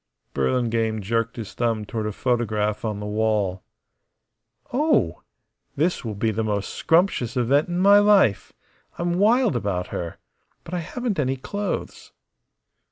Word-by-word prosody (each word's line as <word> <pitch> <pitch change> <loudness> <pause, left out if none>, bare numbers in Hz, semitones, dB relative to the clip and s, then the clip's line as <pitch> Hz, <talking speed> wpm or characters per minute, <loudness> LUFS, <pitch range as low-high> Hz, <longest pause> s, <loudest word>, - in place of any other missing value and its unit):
Burlingame 115 - 0
jerked 115 +3 -1
his 110 -4 -7
thumb 115 -3 -1
toward 110 0 -3
a - - -2
photograph 110 -3 -1
on 105 -2 -2
the 105 - -5
wall. 105 -3 0 1.1
"Oh! 250 - +2 0.5
This 170 +5 0
will 110 -3 -4
be 110 +2 0
the 110 +1 -1
most 105 -2 -2
scrumptious 165 - +1
event 135 +5 +2
in 175 0 -3
my 200 +2 +7
life. 205 - +4 0.5
I'm 175 +1 -1
wild 230 +3 +3
about 90 -3 -2
her! 85 -1 -5 0.5
But 170 - -10
I 180 - 0
haven't 210 +3 -3
any 135 -2 +1
clothes!" 200 +8 -5
115 Hz, 140 wpm, -23 LUFS, 105-175 Hz, 1.1 s, my